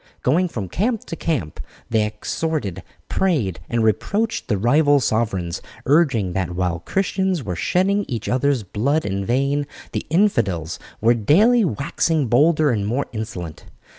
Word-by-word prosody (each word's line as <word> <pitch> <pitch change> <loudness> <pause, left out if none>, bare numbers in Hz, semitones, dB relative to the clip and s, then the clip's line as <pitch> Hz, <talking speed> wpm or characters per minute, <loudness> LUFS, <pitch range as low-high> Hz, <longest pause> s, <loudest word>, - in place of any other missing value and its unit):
Going 170 +8 +3
from 110 - -5
camp 220 - -1
to - - -5
camp 130 - -2 0.3
they 110 -2 +3
exhorted, 105 - -3 0.3
prayed, 135 - 0
and 115 -1 +1
reproached 205 - 0
the 105 -5 +1
rival 145 +7 +4
sovereigns, 105 -8 -1 0.2
urging 135 - +2
that 90 -2 -2
while 90 -2 -1
Christians 190 - -1
were 95 -5 -3
shedding 195 - +1
each 115 -4 -4
other's 130 -1 +1
blood 130 - 0
in 100 0 -2
vain, 140 +5 0 0.2
the - - -4
infidels 110 - +1 0.2
were 115 +2 +5
daily 200 - +4
waxing 155 - 0
bolder 150 +4 +4
and 105 -3 -1
more 125 +6 0
insolent. 105 -8 -6
125 Hz, 140 wpm, -21 LUFS, 100-160 Hz, 0.3 s, were